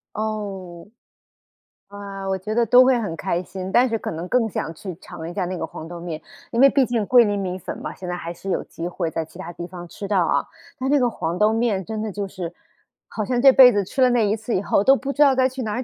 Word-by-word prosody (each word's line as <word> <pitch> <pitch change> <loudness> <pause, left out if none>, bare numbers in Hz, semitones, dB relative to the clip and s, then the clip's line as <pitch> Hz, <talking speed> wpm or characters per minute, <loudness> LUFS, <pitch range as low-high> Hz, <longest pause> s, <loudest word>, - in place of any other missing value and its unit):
哦。 200 -5 -5 1.0
啊， 200 -1 -8
我 190 - 0
觉 200 +4 -4
得 235 0 +3
都 245 +3 +7
会 255 -1 +3
很 205 -8 -3
开 175 0 -2
心， 185 +1 -7
但 245 +4 +5
是 225 -2 -2
可 - - -4
能 165 +2 -5
更 230 +1 +1
想 165 - -4
去 180 +2 -8
尝 160 -2 -8
一 - - -6
下 185 +1 -2
那 185 +1 -4
个 170 - -4
黄 160 - -9
豆 175 0 -8
面。 170 -2 -5 0.3
因 230 - -2
为 275 - +9
毕 275 -2 +3
竟 230 -3 0
桂 245 +3 +6
林 205 -2 0
米 185 -2 -3
粉 - - -6
嘛， - - -6
现 180 - -8
在 180 - -3
还 170 0 -6
是 195 +3 -8
有 - - 0
机 170 - -6
会 175 -2 -3
在 165 - -2
其 160 - -15
它 170 - -7
地 175 0 -7
方 175 -1 -9
吃 200 +4 -7
到 190 -4 +2
啊。 - - +1 0.4
但 260 +1 -1
那 290 - +4
个 250 - +3
黄 175 -7 -3
豆 210 +2 +3
面 220 -5 0
真 220 -1 -4
的 215 -1 -3
就 200 +1 -4
是， 185 -3 -6 0.6
好 215 - -4
像 245 +4 -1
这 270 +2 +8
辈 255 -1 +8
子 205 -3 0
吃 265 - -3
了 255 - +6
那 240 -3 +2
一 205 - +1
次 225 +1 -3
以 185 - +1
后 200 - +2
都 270 +5 +6
不 275 +1 -4
知 295 - -1
道 280 -2 +6
该 260 0 +3
去 260 0 -6
哪 215 -3 -3
儿 250 - -2
205 Hz, 300 characters per minute, -22 LUFS, 180-240 Hz, 1.0 s, 为